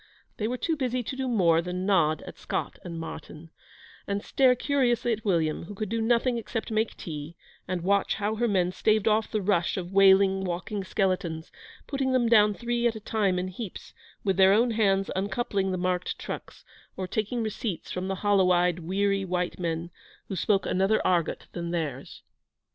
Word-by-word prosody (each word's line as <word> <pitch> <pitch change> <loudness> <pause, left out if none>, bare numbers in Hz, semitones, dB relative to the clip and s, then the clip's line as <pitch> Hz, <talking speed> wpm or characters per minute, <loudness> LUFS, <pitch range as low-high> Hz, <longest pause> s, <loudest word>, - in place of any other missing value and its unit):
They 215 - -1
were 250 +2 -2
too 325 +7 -1
busy 255 -3 -1
to 260 - -5
do 265 0 -2
more 175 -9 +3
than 180 +1 -4
nod 160 -6 +2
at - - -10
Scott - - -3
and 170 -2 -6
Martyn, 160 0 -8 0.6
and 200 +1 -2
stare 260 -2 +4
curiously 245 -3 +1
at 215 0 -5
William, 165 -6 0
who 205 - -9
could 215 0 -4
do 230 +1 -1
nothing 235 +1 +2
except 225 0 -5
make 220 +1 0
tea, 155 0 -7 0.3
and 180 -2 -2
watch 200 +1 +2
how 210 +1 -1
her 240 +1 +1
men 185 -4 +1
staved 215 +2 +1
off 215 0 +2
the 215 -2 -2
rush 185 -3 +1
of 180 0 -5
wailing, 195 0 +5
walking 185 +3 -3
skeletons, 185 -4 -1 0.3
putting 270 -2 -1
them 245 -2 +3
down 210 -2 +5
three 240 +1 0
at 230 - -1
a - - -5
time 205 -3 0
in 180 +1 -2
heaps, 190 +1 -8 0.3
with 195 -2 +1
their 190 0 +6
own 235 +3 +3
hands 195 -3 +2
uncoupling 200 0 -1
the 185 - -1
marked 180 0 -1
trucks, - - -8 0.3
or 185 - -3
taking 220 +4 -2
receipts 215 -3 -4
from 185 +1 -3
the 190 - -1
hollowed 195 -3 +4
eyed, 175 0 +2
weary 195 +3 0
white 180 -1 -2
men, 170 0 -3 0.4
who 195 - -3
spoke 195 +3 +1
another 195 +4 +2
argot 175 -3 +1
than 170 -1 -4
theirs. 155 -6 -4
195 Hz, 185 wpm, -27 LUFS, 180-220 Hz, 0.6 s, their